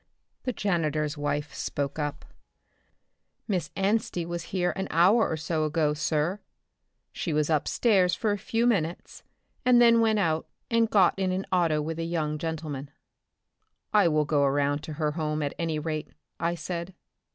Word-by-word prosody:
The 255 Hz, -, 0 dB
janitor's 155 Hz, -8 st, -1 dB
wife 145 Hz, 0 st, -2 dB
spoke 140 Hz, +1 st, -3 dB
up, 145 Hz, 0 st, -3 dB, 1.2 s
"Miss 180 Hz, -8 st, -1 dB
Anstey 195 Hz, -3 st, 0 dB
was 170 Hz, 0 st, -4 dB
here 180 Hz, -2 st, 0 dB
an 190 Hz, 0 st, -3 dB
hour 190 Hz, +8 st, +4 dB
or 160 Hz, -, -1 dB
so 155 Hz, 0 st, -1 dB
ago, 155 Hz, -1 st, +1 dB
sir. 155 Hz, +5 st, 0 dB, 0.7 s
She 165 Hz, -, -3 dB
was 150 Hz, +1 st, +1 dB
upstairs 180 Hz, -, +2 dB
for 215 Hz, -, 0 dB
a 205 Hz, -, 0 dB
few 225 Hz, +3 st, 0 dB
minutes, 180 Hz, -8 st, -1 dB, 0.4 s
and 250 Hz, -1 st, +5 dB
then 235 Hz, -1 st, +6 dB
went 220 Hz, -1 st, +3 dB
out 160 Hz, -5 st, 0 dB, 0.2 s
and 230 Hz, -1 st, +3 dB
got 190 Hz, -5 st, +5 dB
in 190 Hz, -1 st, +1 dB
an 185 Hz, +1 st, -2 dB
auto 165 Hz, -5 st, +2 dB
with 160 Hz, +2 st, -4 dB
a -, -, -1 dB
young 155 Hz, -3 st, -2 dB
gentleman." 155 Hz, -4 st, -4 dB, 1.0 s
"I 210 Hz, -4 st, +5 dB
will 155 Hz, -2 st, +2 dB
go 145 Hz, -1 st, +2 dB
around 140 Hz, +1 st, +1 dB
to 155 Hz, -, -6 dB
her 150 Hz, 0 st, -1 dB
home 155 Hz, -1 st, -2 dB
at 140 Hz, -, -2 dB
any 165 Hz, -2 st, -1 dB
rate," 155 Hz, 0 st, -3 dB, 0.3 s
I 170 Hz, +1 st, 0 dB
said. 170 Hz, +2 st, -5 dB
165 Hz, 165 wpm, -27 LUFS, 150-190 Hz, 1.2 s, then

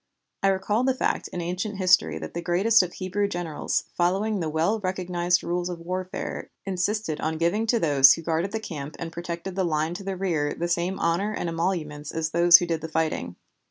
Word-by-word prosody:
I 195 Hz, -, +3 dB
recalled 205 Hz, +6 st, +1 dB
the 260 Hz, -, +2 dB
fact -, -, -1 dB
in 175 Hz, -, -5 dB
ancient 185 Hz, +4 st, -3 dB
history 80 Hz, -, +3 dB
that 80 Hz, 0 st, -7 dB
the 170 Hz, -, -3 dB
greatest 190 Hz, +7 st, +4 dB
of 180 Hz, -1 st, -4 dB
Hebrew 195 Hz, +2 st, -1 dB
generals, 175 Hz, -5 st, -2 dB
following 195 Hz, +4 st, +1 dB
the 160 Hz, -3 st, -2 dB
well 165 Hz, +8 st, +1 dB
recognized 180 Hz, -2 st, 0 dB
rules 175 Hz, +1 st, -2 dB
of 175 Hz, -2 st, -5 dB
warfare, 185 Hz, +2 st, -5 dB, 0.2 s
insisted 195 Hz, -2 st, -1 dB
on 160 Hz, 0 st, -1 dB
giving 185 Hz, +7 st, +1 dB
to 235 Hz, -, +3 dB
those 140 Hz, -6 st, +6 dB
who 165 Hz, -, -6 dB
guarded 165 Hz, +4 st, -1 dB
the 220 Hz, -, -2 dB
camp 155 Hz, -8 st, -7 dB
and 165 Hz, -1 st, -6 dB
protected 170 Hz, +2 st, -5 dB
the 190 Hz, -, +1 dB
line 160 Hz, -1 st, 0 dB
to 195 Hz, +3 st, -7 dB
the 195 Hz, -1 st, -4 dB
rear 165 Hz, -6 st, -1 dB
the 170 Hz, -, -2 dB
same 175 Hz, +2 st, -1 dB
honor 195 Hz, +6 st, 0 dB
and 170 Hz, -, -2 dB
emoluments 165 Hz, -4 st, -2 dB
as 160 Hz, -1 st, -2 dB
those 170 Hz, +1 st, +8 dB
who 175 Hz, -, -2 dB
did 165 Hz, -2 st, -2 dB
the 160 Hz, -, -6 dB
fighting. 155 Hz, -, -1 dB
175 Hz, 205 wpm, -25 LUFS, 165-190 Hz, 0.2 s, those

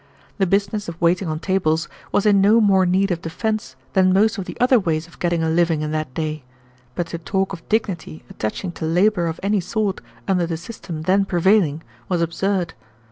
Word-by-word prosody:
The 195 Hz, -, +3 dB
business 200 Hz, +1 st, 0 dB
of 170 Hz, 0 st, -8 dB
waiting 175 Hz, +2 st, +2 dB
on 155 Hz, -1 st, -2 dB
tables 165 Hz, -4 st, 0 dB, 0.2 s
was 205 Hz, -, +1 dB
in 200 Hz, -2 st, +5 dB
no 210 Hz, +4 st, +5 dB
more 195 Hz, -4 st, +4 dB
need 190 Hz, +2 st, +2 dB
of 170 Hz, -1 st, -1 dB
defense 210 Hz, -, -3 dB, 0.2 s
than 185 Hz, -1 st, +4 dB
most 205 Hz, +3 st, +3 dB
of 190 Hz, -, -4 dB
the -, -, -8 dB
other 250 Hz, 0 st, +5 dB
ways 165 Hz, -5 st, -1 dB
of 170 Hz, -, -19 dB
getting 170 Hz, -2 st, 0 dB
a 160 Hz, -, +1 dB
living 165 Hz, -2 st, +2 dB
in 150 Hz, -, -3 dB
that 155 Hz, -3 st, -2 dB
day, 155 Hz, -1 st, -2 dB, 0.5 s
but 175 Hz, -, -1 dB
to 170 Hz, -, -5 dB
talk 190 Hz, +3 st, -1 dB
of 170 Hz, -, -10 dB
dignity 190 Hz, -8 st, -2 dB
attaching 120 Hz, -, -4 dB
to 165 Hz, -, -5 dB
labor 175 Hz, +2 st, +2 dB
of 165 Hz, 0 st, -4 dB
any 205 Hz, +1 st, +2 dB
sort 195 Hz, +2 st, -2 dB, 0.3 s
under 180 Hz, -3 st, +1 dB
the 165 Hz, -1 st, -2 dB
system 170 Hz, -3 st, -7 dB
then 190 Hz, +4 st, +3 dB
prevailing 175 Hz, -4 st, +2 dB, 0.3 s
was 180 Hz, -2 st, +1 dB
absurd. 175 Hz, +1 st, -1 dB
180 Hz, 200 wpm, -21 LUFS, 165-200 Hz, 0.5 s, in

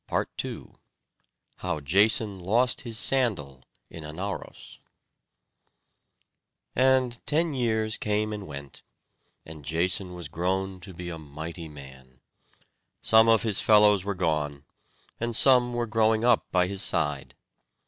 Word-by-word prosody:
PART -, -, -1 dB
II -, -, -8 dB, 0.9 s
How 90 Hz, -4 st, -3 dB
Jason 100 Hz, +6 st, +2 dB
Lost 115 Hz, +8 st, +1 dB
His 115 Hz, -3 st, -4 dB
Sandal 95 Hz, -, +1 dB, 0.3 s
in 80 Hz, -, -11 dB
Anauros 90 Hz, +7 st, -7 dB, 2.0 s
And 130 Hz, -2 st, +2 dB
ten 160 Hz, +1 st, +1 dB
years 110 Hz, -4 st, 0 dB
came 105 Hz, 0 st, -1 dB
and 105 Hz, -2 st, -7 dB
went, 70 Hz, -2 st, -10 dB, 0.6 s
and 80 Hz, -2 st, -11 dB
Jason 90 Hz, +4 st, -1 dB
was 85 Hz, -3 st, -7 dB
grown 95 Hz, +4 st, -3 dB
to 95 Hz, -1 st, -11 dB
be 90 Hz, 0 st, -7 dB
a 80 Hz, -, -7 dB
mighty 80 Hz, +3 st, -8 dB
man. 65 Hz, -3 st, -14 dB, 0.8 s
Some 110 Hz, 0 st, +5 dB
of 115 Hz, -1 st, +4 dB
his 110 Hz, -4 st, +1 dB
fellows 105 Hz, -3 st, +4 dB
were 100 Hz, 0 st, -3 dB
gone, 75 Hz, -5 st, -2 dB, 0.5 s
and 120 Hz, 0 st, -2 dB
some 125 Hz, -1 st, +6 dB
were 120 Hz, 0 st, -2 dB
growing 110 Hz, 0 st, +1 dB
up 120 Hz, -2 st, +3 dB
by 90 Hz, -1 st, +2 dB
his 95 Hz, +1 st, -2 dB
side. 70 Hz, -2 st, 0 dB
95 Hz, 130 wpm, -26 LUFS, 80-110 Hz, 2.0 s, some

